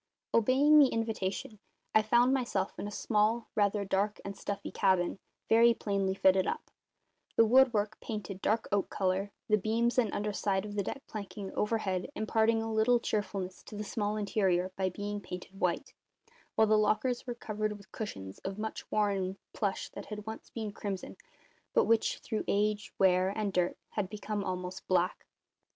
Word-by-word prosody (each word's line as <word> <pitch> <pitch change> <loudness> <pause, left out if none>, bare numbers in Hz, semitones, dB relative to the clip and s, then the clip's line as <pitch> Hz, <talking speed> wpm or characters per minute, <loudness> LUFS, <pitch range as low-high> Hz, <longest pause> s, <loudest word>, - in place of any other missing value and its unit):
Obeying 270 +7 +6
the 285 - +8
invitation, 225 0 -2 0.3
I 215 - +6
found 240 +4 +4
myself 235 -7 -1
in - - -3
a - - -6
small, 215 +2 +1
rather 205 -1 +1
dark 200 +2 0
and 200 0 -5
stuffy 200 +1 -5
cabin, 185 -1 +2 0.3
very 230 +1 +6
plainly 195 -3 0
fitted 190 -1 +4
up; - - -3 0.6
the 225 - +6
woodwork 220 -3 +4
painted 200 -3 -5
dark 220 +1 +1
oak 200 -1 +1
colour, 190 +1 0 0.2
the 215 -1 +4
beams 230 +5 +1
and 225 -5 +2
underside 205 -1 -1
of 205 - -6
the 205 - 0
deck 275 +7 -5
planking 200 -2 -6
overhead 210 -3 -1
imparting 225 +1 +2
a 225 0 -3
little 230 +3 +4
cheerfulness 200 -4 -3
to - - -11
the 210 - -3
small 210 0 -2
interior 190 -3 +1
by 190 -1 0
being 205 +2 -4
painted 180 0 -8
white, 180 +9 0 0.6
while 220 - +5
the 215 0 +4
lockers 240 +4 +1
were 245 - -3
covered 215 -2 -3
with 200 -2 -18
cushions 95 - -6
of 195 +1 -5
much 220 +1 -5
worn 195 -3 0 0.2
plush 200 -2 -1
that - - -9
had 210 -1 -6
once 220 0 -7
been 220 -3 -4
crimson, 200 -2 -5 0.6
but - - +5
which, 225 -1 +2
through 220 -2 -2
age, 210 +1 +1
wear, 185 -1 +4
and 200 0 -2
dirt, 180 -1 +1
had 200 -3 -2
become 210 0 -3
almost 185 0 -4
black. 180 +1 +1
210 Hz, 170 wpm, -31 LUFS, 195-220 Hz, 0.6 s, the